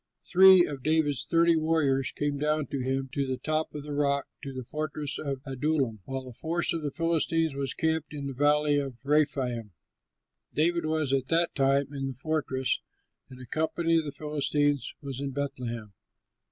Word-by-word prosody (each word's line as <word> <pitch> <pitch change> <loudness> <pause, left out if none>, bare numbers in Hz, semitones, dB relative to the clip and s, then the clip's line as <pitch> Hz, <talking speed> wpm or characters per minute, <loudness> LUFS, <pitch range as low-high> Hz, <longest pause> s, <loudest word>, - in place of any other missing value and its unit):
Three 185 -1 +7
of 140 -3 -5
David's 145 -3 +1
thirty 170 +1 +4
warriors 155 -4 +1
went 145 -1 0
down 150 0 +1
to 140 - -2
him 135 +1 -1
to 140 -1 -1
the 130 0 -2
top 155 +1 -2
of 145 - -5
the 150 0 -6
rock, 140 -1 +1 0.2
to 140 - -6
the 130 -1 -6
fortress 150 +2 -4
of 140 -3 -3
Adullam, 135 -4 -1
while 135 -1 -5
a 125 - -9
force 165 +8 0
of 165 - -2
the 150 - -2
Philistines 165 0 0
was 135 -1 -2
camped 160 -1 -1
in 145 -2 -5
the 135 - -4
Valley 145 +2 +3
of 135 -3 -4
Rephaim. 135 -8 0 0.8
David 170 +1 +2
was 155 -3 0
at 135 -1 +1
that 165 +1 +2
time 135 0 +2
in 135 -1 -3
the 135 - -4
fortress, 135 -3 -1 0.5
and 130 - -12
a 130 - -9
company 165 +4 0
of 160 - -4
the 145 - -4
Philistines 145 -2 0
was 135 -2 -5
in 140 -1 -3
Bethlehem. 125 -6 -4
145 Hz, 180 wpm, -28 LUFS, 135-155 Hz, 0.8 s, Three